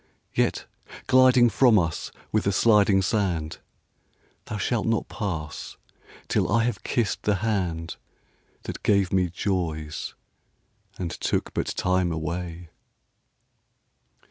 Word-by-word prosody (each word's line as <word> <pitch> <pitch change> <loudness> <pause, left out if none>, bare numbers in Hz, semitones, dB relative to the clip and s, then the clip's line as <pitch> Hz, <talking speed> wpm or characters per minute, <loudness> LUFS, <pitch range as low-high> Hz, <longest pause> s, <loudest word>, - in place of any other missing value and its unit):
Yet, - - 0 0.4
gliding 130 -1 +6
from 120 0 +5
us 85 -4 -1 0.2
with 110 - +1
the 100 - +2
sliding 100 -2 +4
sand, 90 -7 -1 0.9
Thou 105 - -5
shalt 115 +3 -1
not 115 -1 0
pass 85 -8 -5 0.5
till - - +1
I 115 +2 +3
have 120 +1 -1
kissed 115 -5 -1
the 105 - +1
handThat 90 -6 -5
gave 100 -3 +2
me 90 -2 +2
joys, 85 -4 -3 0.8
and 85 -3 -3
took - - -2
but - - -1
time 90 -1 0
away. 85 +1 -5
95 Hz, 110 wpm, -25 LUFS, 85-110 Hz, 0.9 s, gliding